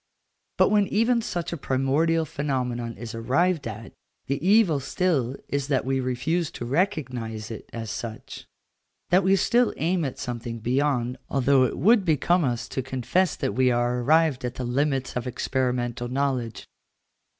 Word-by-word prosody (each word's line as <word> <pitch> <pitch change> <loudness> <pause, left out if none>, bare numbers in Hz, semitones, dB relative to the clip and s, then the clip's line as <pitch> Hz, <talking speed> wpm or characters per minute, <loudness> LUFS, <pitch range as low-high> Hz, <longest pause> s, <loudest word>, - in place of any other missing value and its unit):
But - - +5
when 205 -2 +3
even 230 +2 +2
such 175 -6 -3
a - - -3
primordial 145 +5 +1
phenomenon 125 -6 -3
is 115 +1 -7
arrived 140 +8 +1
at, 110 0 -8 0.3
the 140 +3 -2
evil 190 -6 +4
still 140 -4 0
is 140 -1 -2
that 135 -4 0
we 135 0 0
refuse 140 +7 -1
to 120 - -5
recognise 125 - -2
it 110 - -8
as 115 -2 -5
such, 115 -2 -7 0.6
that 185 +2 +5
we 190 +1 +4
still 240 +5 +2
aim 170 +2 0
at 135 -3 -3
something 120 -2 -5
beyond, 125 +1 0
although 135 -1 +3
it - - -3
would 220 +1 +4
become 170 +2 +2
us 120 -3 -1
to 130 - -2
confess 130 +8 0
that - - -2
we 130 +3 +3
are 120 0 +1
arrived 155 0 +3
at 125 0 -3
the 130 - -4
limits 135 +1 0
of 125 +1 -3
experimental 125 -1 -1
knowledge. 125 -4 -2
135 Hz, 160 wpm, -25 LUFS, 120-165 Hz, 0.6 s, But